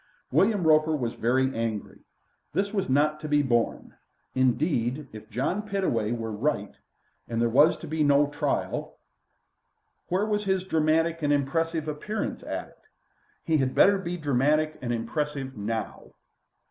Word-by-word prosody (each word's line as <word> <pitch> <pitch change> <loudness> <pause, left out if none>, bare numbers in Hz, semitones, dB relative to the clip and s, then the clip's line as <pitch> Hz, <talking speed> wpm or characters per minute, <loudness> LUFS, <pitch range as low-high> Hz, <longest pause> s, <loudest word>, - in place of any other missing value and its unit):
William 200 -2 +3
Roper 155 0 +4
was 120 -3 -2
very 130 +3 +1
angry. 115 -2 -3 0.5
This 200 +2 0
was 195 -9 -1
not 150 +3 +2
to 155 - -6
be 145 0 +3
borne. 120 -3 0 0.4
Indeed, 130 +1 +1
if 110 0 -11
John 130 - -1
Pittaway 190 - -1
were 115 -2 -3
right, 105 - -1 0.6
and 115 -1 -2
there 120 - +3
was 145 +7 +5
to 170 - -9
be 155 0 0
no 145 0 +5
trial, 145 +1 -2 1.1
where 190 +4 +1
was 210 -1 -1
his 190 -1 +1
dramatic 165 -1 +1
and 145 -1 +1
impressive 155 +3 0
appearance 155 +9 -3
at - - -5
it? - - -25 0.6
He 160 -1 +2
had 130 -2 0
better 200 0 +5
be 180 -1 -4
dramatic 150 +1 +1
and 120 -2 -2
impressive 135 +3 -3
now. 110 0 -4
150 Hz, 145 wpm, -27 LUFS, 120-165 Hz, 1.1 s, was